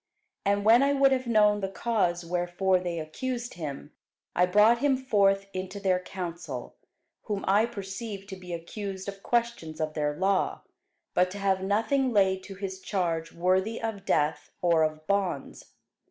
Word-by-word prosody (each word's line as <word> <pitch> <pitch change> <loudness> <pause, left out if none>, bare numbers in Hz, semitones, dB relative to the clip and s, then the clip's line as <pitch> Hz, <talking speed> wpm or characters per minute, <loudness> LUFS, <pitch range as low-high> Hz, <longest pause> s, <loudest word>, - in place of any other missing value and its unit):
And 200 0 +2
when 230 +3 +7
I 280 +1 +3
would 275 -1 +4
have 260 -1 0
known 210 -2 +4
the 195 -1 -2
cause 190 -5 0
wherefore 175 +2 +1
they 175 -2 -3
accused 240 +10 -4
him, 145 -2 -6 0.4
I 180 +1 +4
brought 210 +5 +5
him 280 -1 +3
forth 200 -6 +2
into 190 +2 -5
their 190 -2 +2
council: 170 -8 -6 0.5
whom 205 -2 -3
I 205 +4 +4
perceived 200 -1 -6
to 190 - -5
be 180 -1 -10
accused 190 +3 -5
of 195 0 -6
questions 235 -11 -1
of 155 -1 -2
their 150 -1 -1
law, 190 +1 +1 0.5
but 180 0 +3
to 195 - -7
have 195 -1 +1
nothing 230 +7 +1
laid 190 -3 +3
to 195 - -9
his 190 -1 -5
charge 170 -5 -2
worthy 185 +6 +1
of 220 -4 -4
death 150 -1 0
or 170 -2 +3
of 155 0 -1
bonds. 190 -7 -1
195 Hz, 165 wpm, -28 LUFS, 175-210 Hz, 0.5 s, when